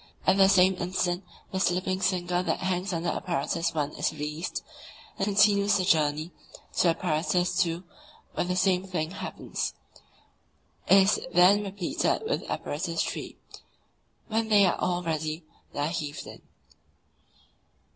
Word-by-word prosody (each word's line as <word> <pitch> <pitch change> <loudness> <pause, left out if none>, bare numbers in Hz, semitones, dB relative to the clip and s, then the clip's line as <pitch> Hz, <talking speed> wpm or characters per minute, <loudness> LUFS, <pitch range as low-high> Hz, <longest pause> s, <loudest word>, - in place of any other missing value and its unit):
At 185 - +4
the 195 -1 +6
same 190 -1 +5
instant 180 0 -1 0.3
the 190 - -2
slipping 185 +1 0
sinker 180 -1 +1
that - - -1
hangs 185 +1 -1
under 170 0 -1
Apparatus 170 0 -1
I. 150 - +2
is - - -2
released, 150 +2 -4 0.6
and 195 - +1
continues 205 0 +4
the 185 - 0
journey 155 -1 +1 0.5
to - - +4
Apparatus 175 +2 +1
II., 170 +1 -4 0.5
where - - 0
the 180 +1 -2
same 185 0 +2
thing 175 -4 -3
happens. 200 - -4 1.1
It 195 - +7
is 200 - +2 0.2
then 185 +4 +6
repeated 195 - -1
with - - 0
Apparatus 165 +2 -2
III. - - -7 0.9
When 225 0 -1
they 205 -2 +6
are 180 - +1
all 180 0 0
ready, 155 0 -2 0.3
they 145 - -4
are 145 - +1
heaved 150 -4 -4
in. - - -11
180 Hz, 140 wpm, -27 LUFS, 165-190 Hz, 1.1 s, It